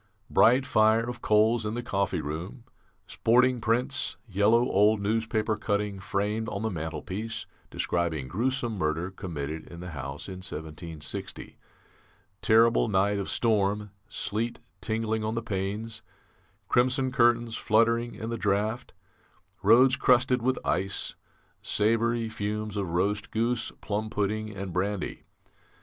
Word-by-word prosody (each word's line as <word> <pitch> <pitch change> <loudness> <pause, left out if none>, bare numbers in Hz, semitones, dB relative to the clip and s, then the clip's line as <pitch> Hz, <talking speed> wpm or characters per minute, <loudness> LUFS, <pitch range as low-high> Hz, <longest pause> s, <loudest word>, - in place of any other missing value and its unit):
"Bright 125 +3 +5
fire 110 +1 +3
of 120 -1 -6
coals 110 +2 +3
in 105 +1 -3
the 120 - -3
coffee 100 -6 -1
room, 80 - -6 0.4
sporting 125 +1 +3
prints, 125 +4 0
yellow 105 +4 +3
old 105 +2 +4
newspaper 110 +1 0
cutting 105 -1 -1
framed 105 +3 -1
on 100 - -4
the 110 - 0
mantelpiece 85 - -4 0.2
describing 80 -6 -1
gruesome 120 - -1
murder 80 +4 -1
committed 80 -4 -5
in 85 - -10
the 90 0 -7
house 70 0 -6
in 95 -2 -6
1760. 80 +2 -7 0.9
Terrible 115 +2 +4
night 100 0 +2
of 100 - -4
storm 105 -2 +1 0.2
sleet 110 +5 -2 0.2
tingling 110 0 -1
on 110 +1 -2
the 115 - -2
panes; 105 +3 -3 0.7
crimson 130 +1 +2
curtains 120 -2 +3
fluttering 115 +2 +2
in 110 +1 -5
the 115 - -3
draught; 105 +4 -1 0.7
roads 125 +6 +6
crusted 125 0 +3
with 130 +2 +1
ice; 95 0 -1 0.5
savoury 115 +2 +1
fumes 105 -1 -3
of 100 -3 -2
roast 100 +5 0
goose, 115 +1 0
plum 105 +1 -2
pudding, 110 +1 -1
and 100 -3 -6
brandy. 100 +1 -2
105 Hz, 130 wpm, -28 LUFS, 95-115 Hz, 0.9 s, roads